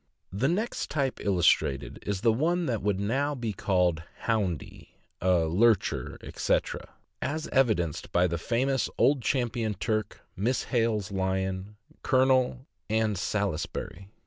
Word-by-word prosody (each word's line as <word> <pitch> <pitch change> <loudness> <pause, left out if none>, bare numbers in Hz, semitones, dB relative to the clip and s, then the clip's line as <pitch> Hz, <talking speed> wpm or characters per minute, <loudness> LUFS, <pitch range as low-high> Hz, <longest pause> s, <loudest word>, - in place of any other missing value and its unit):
The 110 +8 +1
next 210 +9 -1
type 135 -4 -1
illustrated 85 -8 +2
is 100 -2 -1
the 115 -1 +4
one 170 +8 +1
that 115 -7 -1
would 100 -1 0
now 135 +8 0
be 115 -5 -3
called 90 -4 +1 0.2
"houndy," 100 - -2 0.3
a 90 -2 +3
"lurcher," 105 +7 +2
etc., - - -2 0.3
as 155 +2 -2
evidenced 110 - +1
by 90 +1 +3
the 85 -2 -1
famous 130 +7 0
Old 140 -2 +4
Champion 120 -4 0
Turk, 110 +2 -2
Miss 120 +7 0
Kale's 115 -5 +1
Lion, 95 +1 -2 0.3
Colonel, 130 -1 +2 0.2
and 110 -1 +1
Salisbury. 95 -1 -3
110 Hz, 125 wpm, -28 LUFS, 95-130 Hz, 0.3 s, the